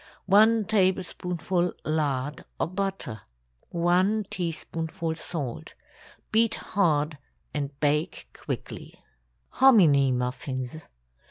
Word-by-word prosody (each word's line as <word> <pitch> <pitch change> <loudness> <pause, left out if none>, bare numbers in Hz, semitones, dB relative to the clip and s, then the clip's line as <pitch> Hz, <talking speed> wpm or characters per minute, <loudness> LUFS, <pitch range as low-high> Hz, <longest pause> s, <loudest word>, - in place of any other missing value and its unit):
1 215 +3 +5
tablespoonful 180 -3 0
lard 145 -2 -1 0.2
or - - +2
butter. 185 - -3 0.5
1 185 +5 +2
teaspoonful 165 -1 -3
salt. 155 -6 -6 0.6
Beat 225 0 +3
hard 155 -6 0 0.3
and 140 -1 -4
bake 150 +3 0
quickly. - - -7 0.5
HOMINY 165 - +5
MUFFINS. 130 +3 -3
165 Hz, 80 wpm, -27 LUFS, 145-190 Hz, 0.6 s, 1